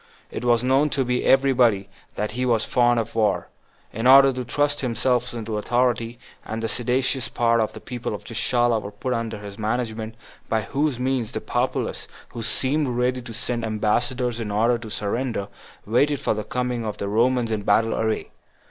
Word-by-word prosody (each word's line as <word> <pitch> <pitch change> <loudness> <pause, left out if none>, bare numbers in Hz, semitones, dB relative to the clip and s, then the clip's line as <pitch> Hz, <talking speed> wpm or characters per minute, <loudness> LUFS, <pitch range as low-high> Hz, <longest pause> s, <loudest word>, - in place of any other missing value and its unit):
It - - -5
was 120 -1 +3
known 135 +4 +3
to 125 -2 0
every 135 0 +4
body 115 -6 +3 0.3
that 105 0 -2
he 125 +3 -2
was 115 -3 +2
fond 120 -1 +3
of 115 -1 -4
war, 105 -6 +1 0.4
in 115 +3 0
order 135 +1 +8
to 125 0 -4
thrust 145 +4 0
himself 125 0 0
into 110 -2 -4
authority; 120 0 0 0.3
and 115 +1 -5
the - - +1
seditious 125 +2 0
part 115 -1 +2
of 110 - -1
the - - -8
people 120 -4 -5
of - - -9
Gischala 120 0 +1
were 105 +5 -4
under 115 -2 -3
his 100 0 -9
management, 110 0 -2 0.3
by 110 -1 +1
whose 140 +2 -1
means 125 -3 -1
the - - -2
populace, - - -2 0.2
who 115 - -7
seemed 140 +6 0
ready 125 +1 0
to 120 -1 -9
send 120 -1 -2
ambassadors 115 +3 0
in 110 -2 -4
order 115 +4 +2
to 115 -1 -8
surrender, 105 0 -2 0.4
waited 140 +6 +2
for - - 0
the 105 0 -4
coming 125 +1 -2
of 105 -2 -4
the 100 - -3
Romans 120 +2 +2
in 110 -1 -1
battle 115 +2 +2
array. 110 -1 -1
120 Hz, 185 wpm, -23 LUFS, 110-125 Hz, 0.4 s, order